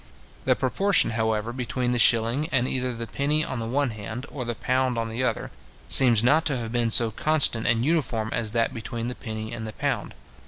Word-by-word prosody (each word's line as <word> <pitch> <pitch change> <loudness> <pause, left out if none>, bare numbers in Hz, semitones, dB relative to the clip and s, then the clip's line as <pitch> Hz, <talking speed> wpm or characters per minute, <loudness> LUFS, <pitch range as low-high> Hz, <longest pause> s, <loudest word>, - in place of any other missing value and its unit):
The - - +3
proportion, 200 -8 +2
however, 110 0 -1
between 125 0 -2
the 120 - 0
shilling, 115 +7 +3
and 125 -2 +1
either 130 -1 -1
the 115 -1 -6
penny 150 +5 0
on 130 - -5
the 115 - -4
one 135 +2 0
hand, 110 +4 -7
or 135 - -5
the 120 -1 -4
pound 130 0 -1
on 115 0 -2
the 115 +3 -3
other, 125 - -2 0.4
seems 120 -5 +5
not 150 +6 +3
to 145 -4 0
have 115 -2 -5
been 120 -1 0
so 115 0 +5
constant 140 -3 +1
and 115 0 +1
uniform 125 -9 -1
as 115 -2 0
that 115 +1 -1
between 115 +1 -5
the - - -4
penny 110 -1 -7
and 110 -1 -6
the 110 - -7
pound. 135 - -3
120 Hz, 210 wpm, -25 LUFS, 115-130 Hz, 0.4 s, seems